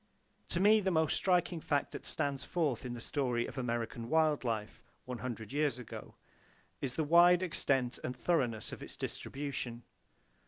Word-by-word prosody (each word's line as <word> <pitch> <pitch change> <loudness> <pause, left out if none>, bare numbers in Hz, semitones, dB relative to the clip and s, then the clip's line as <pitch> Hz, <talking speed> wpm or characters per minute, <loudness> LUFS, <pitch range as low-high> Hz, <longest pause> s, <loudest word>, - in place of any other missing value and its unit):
To 170 - -1
me 210 +3 +6
the 195 -2 +1
most 160 -4 +2
striking 180 -2 +2
fact 145 -2 0
that - - -5
stands 140 -3 0
forth 145 -9 -1
in 120 -1 -4
the - - -7
story 120 -2 0
of - - -8
American 120 -1 -3
wild 155 -3 +3
life 110 -3 -3 0.2
one 125 -2 -5
hundred 110 -2 -5
years 145 -4 +1
ago 125 -3 -9 0.7
is 130 -3 -2
the 160 - +1
wide 175 +3 +6
extent 135 -7 +1
and 125 - -3
thoroughness 125 -10 0
of - - -8
its - - -8
distribution. 130 -4 -4
140 Hz, 165 wpm, -33 LUFS, 120-160 Hz, 0.7 s, me